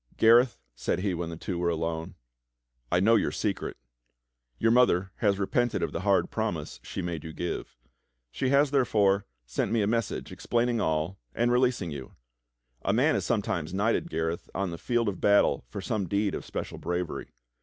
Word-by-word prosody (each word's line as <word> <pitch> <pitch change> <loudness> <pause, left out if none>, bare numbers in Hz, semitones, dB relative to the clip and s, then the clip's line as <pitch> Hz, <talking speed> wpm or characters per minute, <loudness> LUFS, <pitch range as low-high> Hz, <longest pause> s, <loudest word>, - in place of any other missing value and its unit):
"Gareth," 120 +2 +6 0.2
said - - -1
he 95 -1 0
when 85 -1 -3
the 85 - -6
two 85 +1 -4
were 85 0 +1
alone. 80 0 -2 0.8
"I 85 - +4
know 110 +5 +5
your 110 - +3
secret. - - -2 0.8
Your 115 - +3
mother 100 -7 +4
has 100 -3 +2
repented 115 +4 0
of - - -1
the - - -3
hard 100 -1 +2
promise - - -3
she 95 - -5
made 85 -3 -3
you 80 - -6
give. 90 +2 -4 0.5
She 130 - -1
has, 140 +1 +4
therefore, 105 -8 +3 0.2
sent - - -2
me 115 -2 +2
a - - +2
message 115 0 -1
explaining 120 -1 0
all 80 +4 -1 0.2
and 120 +1 +2
releasing 125 -8 +2
you. 70 -2 -8 0.7
A - - +1
man 135 +8 +3
is - - -1
sometimes 95 - -1
knighted, 115 - +1
Gareth, 80 - -2
on 95 -2 -1
the 85 - -6
field 120 -2 0
of 100 - -3
battle 100 -10 +4
for 100 - -5
some 100 0 -2
deed 100 +1 0
of - - -4
special - - -5
bravery. 90 -1 -3
100 Hz, 180 wpm, -28 LUFS, 85-115 Hz, 0.8 s, Gareth